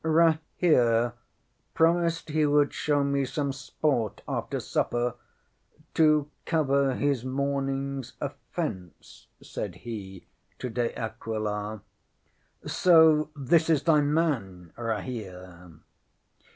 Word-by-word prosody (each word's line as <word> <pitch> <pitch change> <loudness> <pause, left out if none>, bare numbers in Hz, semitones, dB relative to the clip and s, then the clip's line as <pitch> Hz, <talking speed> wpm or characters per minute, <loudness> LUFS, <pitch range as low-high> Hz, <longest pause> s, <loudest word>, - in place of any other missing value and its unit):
ŌĆśŌĆ£Rahere 155 -7 +3 0.6
promised 165 0 +2
he 155 +1 +1
would 145 -1 +3
show 145 -1 +1
me 140 0 +1
some 140 +1 -2
sport 130 -3 -2
after - - -3
supper 120 0 -1 0.8
to 155 -2 +4 0.2
cover 140 -4 +1
his 140 -3 0
morningŌĆÖs 135 0 -2
offence, 90 -5 -6
ŌĆØ - - -19
said - - -5
he 95 -6 -8 0.3
to 125 - -5
De 120 0 -2
Aquila. 110 -2 -4 0.8
ŌĆ£So 160 -4 +5
this 160 +4 +2
is 150 -3 +3
thy 150 -1 +4
man, 135 - -1
Rahere? 95 -7 -6
135 Hz, 100 wpm, -27 LUFS, 115-155 Hz, 0.8 s, ŌĆ£So